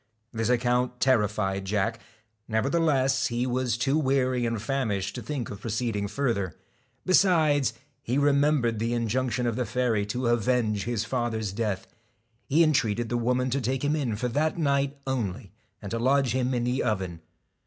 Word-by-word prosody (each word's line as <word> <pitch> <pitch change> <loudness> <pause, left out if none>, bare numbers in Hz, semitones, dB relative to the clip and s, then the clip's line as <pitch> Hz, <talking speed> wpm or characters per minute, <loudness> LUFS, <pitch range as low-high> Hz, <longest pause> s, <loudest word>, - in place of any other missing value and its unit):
This 115 0 -1
account 125 0 +1
terrified 105 -6 +1
Jack; 105 +3 -1 0.5
nevertheless, 135 +2 +2
he 120 0 -1
was 125 -2 0
too 135 +5 +1
weary 130 -3 +1
and 115 -1 -2
famished 105 -6 -1
to - - -6
think 140 -5 -4
of 100 - -8
proceeding 110 -2 -2
farther; 110 - -1 0.5
besides, 155 - +3 0.3
he 125 +3 -1
remembered 140 -5 +2
the 115 +2 0
injunction 120 +1 0
of 120 -2 0
the 125 - 0
fairy 115 -2 +1
to 125 +4 -2
avenge 115 -3 +1
his 115 -2 -1
father's 115 -5 -2
death. 105 -3 -2 0.6
He 155 +4 +4
en 155 -1 +3
treated 115 -3 0
the 120 - -1
woman 125 +2 0
to 140 +2 0
take 130 +3 -1
him 145 +2 +1
in 130 -8 -1
for 125 +4 -2
that 155 +7 0
night 140 -2 +1
only, 115 -5 -3 0.3
and 100 - -6
to 115 - -1
lodge 135 +1 +2
him 130 0 0
in 120 - 0
the 125 +2 0
oven. 95 -7 -2
125 Hz, 165 wpm, -27 LUFS, 110-135 Hz, 0.6 s, He